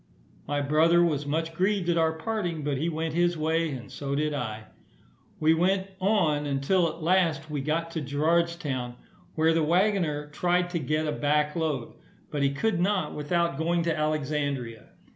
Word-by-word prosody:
My 145 0 0
brother 160 +4 +4
was 150 -4 0
much 160 +2 -1
grieved 190 +1 0
at 175 - +2
our 160 -1 +2
parting, 175 -3 -3
but 140 -2 -1
he 165 +3 0
went 160 -1 -3
his 175 0 +2
way, 160 +1 +1
and 130 -5 -7
so 140 -1 -3
did 150 +1 0
I. 110 -6 -4 0.8
We 155 +1 +4
went 190 +3 +1
on 165 -7 +2
until 145 +6 +2
at 160 +1 -8
last 165 -4 +1
we 145 -2 -2
got 165 +4 -1
to 160 - -3
Gerardstown, 150 -3 0 0.4
where 160 +1 +3
the 165 - +2
waggoner 170 -3 +1
tried 175 +3 0
to 170 - -1
get 155 +2 -1
a 150 - -1
back 150 0 +1
load, 155 -7 -2 0.4
but 145 - -2
he 140 - +3
could 185 +6 0
not 185 -4 0
without 170 0 -1
going 170 +1 +1
to 165 -1 0
Alexandria. 145 -6 -2
160 Hz, 175 wpm, -27 LUFS, 145-170 Hz, 0.8 s, brother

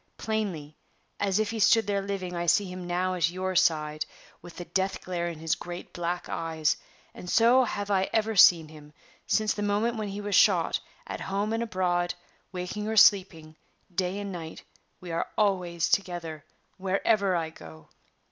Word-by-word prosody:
Plainly, 190 -9 -3 0.4
as 195 -1 +1
if 215 -1 0
he 225 - -4
stood 220 +1 +5
there 200 -1 0
living, 195 -2 -4
I 170 0 -2
see 200 +5 +4
him 180 -1 -7
now 180 +1 0
at 170 -3 +1
your 185 +1 -3
side, 155 -2 +2 0.4
with 175 - -12
the 175 - -6
death 190 +3 -1
glare 175 -1 -2
in 170 -2 -5
his 160 0 -1
great 175 0 -7
black 175 +1 -3
eyes; 160 -2 -1 0.4
and 180 - -9
so 240 +5 +5
have 205 -2 -4
I 190 -1 +2
ever 220 0 0
seen 170 -4 +7
him, 150 -1 -14 0.3
since 215 -1 +2
the 205 - -5
moment 210 +3 0
when 215 -1 -3
he 200 +1 -5
was 205 0 -4
shot; - - +4 0.3
at - - -6
home 200 +3 -2
and 225 - -1
abroad, 180 -5 0 0.4
waking 185 +3 -4
or 220 0 -2
sleeping, 180 -7 +4 0.4
day 185 +2 -1
and 200 -1 -5
night, 165 -3 -8 0.4
we 180 -2 -8
are 165 - -1
always 180 -5 +1
together, 170 -5 -2 0.3
wherever 195 +1 +1
I 165 -2 -2
go!" 80 - -13
185 Hz, 175 wpm, -27 LUFS, 170-205 Hz, 0.4 s, seen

